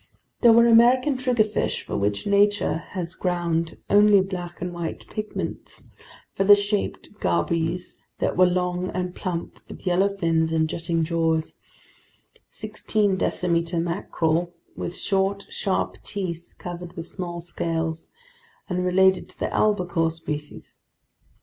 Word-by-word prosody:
There 235 - +8
were 235 +1 +7
American 245 +4 +5
triggerfish 240 -5 0
for - - -5
which 100 0 -1
nature 205 -2 +3 0.2
has 170 -1 -3
ground 170 -2 -1
only 205 0 +6
black 180 -2 -4
and 180 0 -4
white 170 -1 -5
pigments, 215 0 -5 0.5
feather 200 +1 +6
shaped 205 0 -2
gobies 165 - -1 0.2
that - - -1
were 185 0 +6
long 180 0 -1
and 180 -1 -2
plump 175 -3 -5
with - - -11
yellow 195 +2 +2
fins 165 -2 +1
and 160 -1 +2
jutting 165 0 -1
jaws, 160 -1 0 1.0
sixteen 215 -2 -1
decimeter 170 -2 0
mackerel 170 0 -1 0.2
with 175 - -4
short, 195 0 0
sharp 190 -2 -1
teeth, 175 -4 -5
covered 175 0 -7
with 165 -3 -6
small 175 -2 -5
scales, 165 -1 -3 0.6
and 180 -1 -1
related 190 +1 +3
to - - -8
the - - -2
albacore 180 -6 +2
species. 150 -2 -6
180 Hz, 125 wpm, -24 LUFS, 165-200 Hz, 1.0 s, There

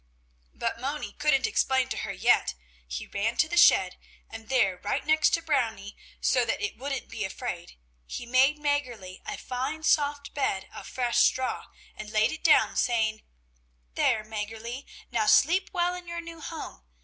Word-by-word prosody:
But 235 - -3
Moni 285 +3 -3
couldn't 295 -3 +2
explain 260 -1 +2
to - - -3
her - - -3
yet; - - +2 0.3
he 60 0 -5
ran 215 +3 -2
to 305 - +3
the 345 - -3
shed, 345 - +5 0.3
and 225 0 -10
there 220 -9 +2
right 205 - -2
next 310 0 +4
to 330 - -6
Brownie, 225 -10 -1 0.2
so - - +2
that - - -1
it 415 - -3
wouldn't 275 0 -4
be 215 - -5
afraid, 190 - -5 0.3
he 240 - -6
made 260 +5 +4
Mäggerli 255 -11 -2
a - - -4
fine, 265 +5 -4
soft 290 -2 +1
bed 195 -9 -1
of - - -9
fresh 240 -2 0
straw, 255 +2 +1 0.3
and 215 0 -8
laid 215 0 +2
it 315 - -7
down, - - +5
saying: 220 -3 +1 0.7
"There, 215 - +2
Mäggerli, 225 +4 -6 0.3
now 220 -3 +1
sleep 355 - +4
well 355 -1 +1
in 360 -1 -8
your 340 0 -4
new 335 -1 -9
home! 310 - -7
255 Hz, 170 wpm, -27 LUFS, 220-300 Hz, 0.7 s, shed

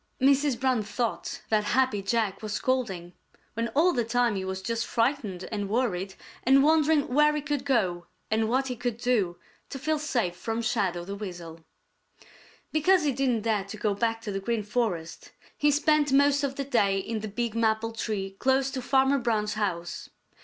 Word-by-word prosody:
Mrs. 275 -1 +3
Brown 260 -3 +2
thought 220 +3 -3
that 215 -1 +2
Happy 255 -6 +2
Jack 200 -1 -1
was 215 -1 -4
scolding, 205 -9 -1 0.4
when 230 +1 -1
all 345 +5 +4
the 240 - +1
time 235 -1 +1
he 190 - -2
was 190 0 -4
just 230 +2 -2
frightened 230 -7 -1
and 205 -2 -3
worried 200 -5 -1 0.3
and 270 +2 +5
wondering 310 -1 +3
where 300 +3 +3
he - - 0
could 290 -2 -2
go 185 -11 0 0.2
and 220 0 +1
what 260 +3 +1
he 250 - -3
could 245 -1 -3
do 230 -8 0 0.3
to 275 - -6
feel 310 +3 -1
safe 240 - -1
from 225 +5 -3
Shadow 190 -6 -1
the 200 - -5
Weasel. 175 -5 -7 1.1
Because 345 +3 +3
he 290 - +2
didn't 255 -4 0
dare 215 -4 0
to 200 +2 -8
go 210 0 0
back 225 +2 -1
to 210 - -4
the 195 - -2
Green 220 +2 -1
Forest, 205 -7 -3 0.2
he 295 - +2
spent 295 0 +2
most 285 +1 +4
of 270 -1 -1
the 275 - -3
day 200 -7 +2
in 220 +3 -3
the 215 - -5
big 230 +2 -3
maple 225 0 +1
tree 210 -3 -3
close 265 0 +2
to 260 - -4
Farmer 270 +2 +3
Brown's 215 -4 0
house. 180 -5 -3
230 Hz, 185 wpm, -27 LUFS, 205-270 Hz, 1.1 s, and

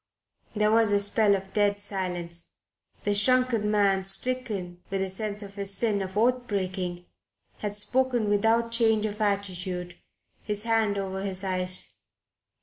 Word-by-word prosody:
There 210 0 +2
was 225 -1 +4
a 205 - +3
spell 205 0 +3
of 195 0 -7
dead 205 -1 +2
silence. 180 -4 -3 0.5
The 205 - +1
shrunken 235 0 +2
man, 200 -2 +2
stricken 195 -4 -1
with 195 - -2
a 190 - -3
sense 210 +1 -3
of 200 0 -10
his 200 -1 +2
sin 210 -3 +1
of 190 +1 -5
oath 245 +2 +2
breaking, 185 -3 -3 0.5
had 205 -1 -4
Spoken 245 +1 +2
without 225 +3 +2
change 225 -2 +3
of 210 0 -4
attitude, 185 -3 -1 0.4
his 210 -1 -3
hand 225 -3 +1
over 190 -1 -3
his 195 -1 -1
eyes. 185 -1 -2
205 Hz, 145 wpm, -27 LUFS, 190-220 Hz, 0.5 s, was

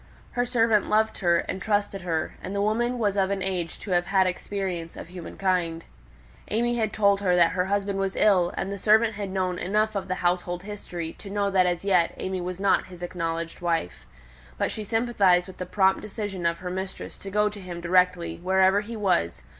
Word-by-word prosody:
Her 245 0 0
servant 230 -4 +2
loved 220 +1 +2
her 175 -2 +3
and 190 - -5
trusted 205 -2 0
her; 165 -3 -2
and 195 - -5
the 200 - 0
woman 240 +4 +1
was 205 -4 +1
of 195 -1 +2
an 195 -1 -1
age 180 -4 -2
to 200 - -6
have 175 -1 +2
had 190 -1 +3
experience 180 -2 -3
of - - -8
humankind. 175 -1 -2 0.7
AimÄe 240 +2 +1
had 220 -3 0
told 200 -2 +3
her 180 -3 +3
that 170 -1 +5
her 180 0 0
husband 200 0 -1
was 195 0 -1
ill, 185 -5 +4
and 195 - -2
the 200 - -5
servant 220 +2 +4
had 205 -1 -4
known 185 -1 -1
enough 215 +4 +1
of 195 - -2
the 185 - -1
household 175 0 0
history 180 -5 -6
to 200 - -9
be 200 - -6
aware 200 -1 +1
that 185 -1 +4
as 175 +1 -2
yet 180 -4 +2
AimÄe 185 -1 -3
was 180 0 -5
not 200 0 +2
his 180 -1 -11
acknowledged 165 -1 -3
wife. 165 - -2 0.5
But - - 0
she 215 - -4
sympathized 205 -5 +2
with 190 -1 -12
the 180 - -5
prompt 190 0 +3
decision 205 -4 -3
of 170 0 0
her 180 0 -6
mistress 190 +1 -5
to 195 - -7
go 210 +2 +2
to 205 -1 -10
him 175 -2 -7
directly, 180 0 +2
wherever 190 +2 +3
he 225 +2 -7
was. 180 - 0
190 Hz, 210 wpm, -26 LUFS, 180-205 Hz, 0.7 s, that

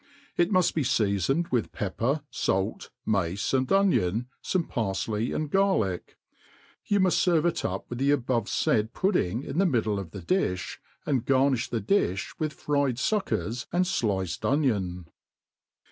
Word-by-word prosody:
It 175 +1 +2
muft 185 -3 +3
be 160 - 0
feafoned 120 - +1
with 120 -4 0
pepper, 120 +9 -1
fait, 95 +3 -1 0.2
mace, 100 0 0
and 130 -1 +2
Mion, 125 - +2 0.2
fomc 180 -3 0
parfley 110 0 -2
and 155 -2 -2
garJick. 190 - +1 0.7
You 205 - +2
muft 185 -2 +3 0.2
ferve 175 -1 +1
k - - 0
up 95 +1 -5
With 120 - -6
the 135 +1 +2
' 145 - +4
abovefaid 115 -2 0
pudding 135 - 0
in 145 +4 -3
the 195 - +4
middle. 110 - 0
of. 95 -4 -6
the - - -8
dijfbj.aiidigarniih 135 - 0
thct 115 -2 -2
iilh' 100 - +1
with 155 -1 -1
fried 140 -4 0
fuckers 120 - -1
and 180 +2 +2
fliccd 100 - -1
onion. 100 - 0
125 Hz, 145 wpm, -27 LUFS, 100-155 Hz, 0.7 s, '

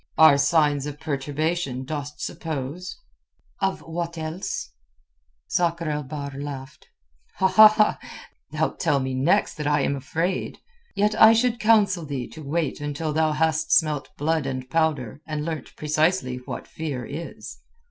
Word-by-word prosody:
"Are 160 -3 +8
signs 145 -1 +2
of 145 0 -7
perturbation, 145 -1 -2
dost 145 0 -5
suppose?" 160 +2 -5 0.6
"Of 195 -1 -1
what 170 0 -5
else?" 160 - -4 0.7
Sakr 170 -2 0
el 150 0 -1
Bahr 140 0 -6
laughed. 140 -2 -8 0.5
"Thou'lt 215 +3 +3
tell 140 - +2
me 130 0 -2
next 150 +11 +2
that 150 -1 -3
I 150 -1 +2
am 140 - 0
afraid. 165 +7 -2 0.4
Yet 210 +1 +2
I 220 +1 +10
should 240 +1 +1
counsel 205 -5 +3
thee 140 -5 -4
to 160 - -10
wait 155 0 -2
until 145 +1 -3
thou 155 0 +2
hast 160 0 0
smelt 150 -3 +2
blood 155 -1 0
and 130 -1 -4
powder, 150 -6 0
and 150 -1 -3
learnt 160 -5 -5
precisely 155 -3 +1
what 125 - -7
fear 140 -6 -5
is." 160 +4 -8
155 Hz, 135 wpm, -24 LUFS, 140-170 Hz, 0.7 s, I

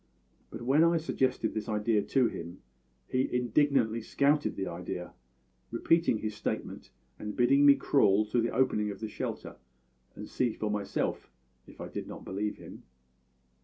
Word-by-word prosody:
But 115 +2 -8
when 140 +6 +4
I 170 0 +4
suggested 130 -7 0
this 110 0 -4
idea 105 0 +1
to 130 +4 +2
him 85 - -8 0.4
he 130 +1 0
indignantly 125 -2 +2
scouted 145 +6 +1
the 95 - -3
idea, 90 0 -6 0.6
repeating 165 - +2
his 110 0 -4
statement - - -5 0.3
and 105 -1 -5
bidding 140 +4 +5
me 140 - +9
crawl 105 -8 +3
to 120 - +3
the 115 - 0
opening 115 -4 +1
of 100 - -6
the 110 - -4
shelter 105 - -6 0.6
and - - -8
see 120 -3 0
for 105 -1 -3
myself, 100 -2 -2 0.4
if - - -16
I - - -5
did - - -6
not - - -9
believe 105 +2 -3
him. - - -11
115 Hz, 160 wpm, -30 LUFS, 105-135 Hz, 0.6 s, me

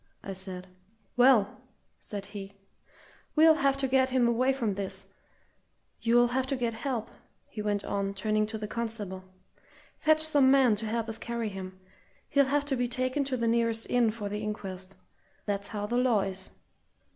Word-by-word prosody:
I 195 - -5
said. 185 -1 -7 0.5
"Well," 245 -5 +4 0.4
said 200 -2 -6
he, 200 -1 -8 0.8
"we'll 320 +1 +7
have 275 -3 +2
to 275 -1 0
get 260 0 +3
him 255 -2 +3
away 250 +3 +2
from 235 -6 -1
this. 195 0 -5 0.9
You'll 240 +1 +4
have 260 +1 0
to 275 - -1
get 240 -3 -1
help," 235 -1 -3 0.4
he 215 - -6
went 205 -1 -1
on, 200 0 -2
turning 215 +2 0
to 220 0 -5
the 210 -1 -5
constable. 210 -5 -5 0.7
"Fetch 310 0 +4
some 290 -4 +5
men 265 -5 +5
to 220 +1 -3
help 230 +1 -1
us 225 0 -3
carry 235 -1 -3
him. 185 -1 -8 0.5
He'll 280 -1 +4
have 285 +2 +1
to 280 -2 -1
be 245 -1 0
taken 255 +3 0
to 265 -1 -1
the 235 -1 0
nearest 230 -1 +1
inn 245 -2 +4
for 215 -1 -4
the 210 +1 -4
inquest 195 -3 -5 0.5
that's 200 -1 -2
how 205 -2 -4
the 240 +3 -1
law 245 -5 +3
is. 190 -1 -4
225 Hz, 175 wpm, -29 LUFS, 200-255 Hz, 0.9 s, we'll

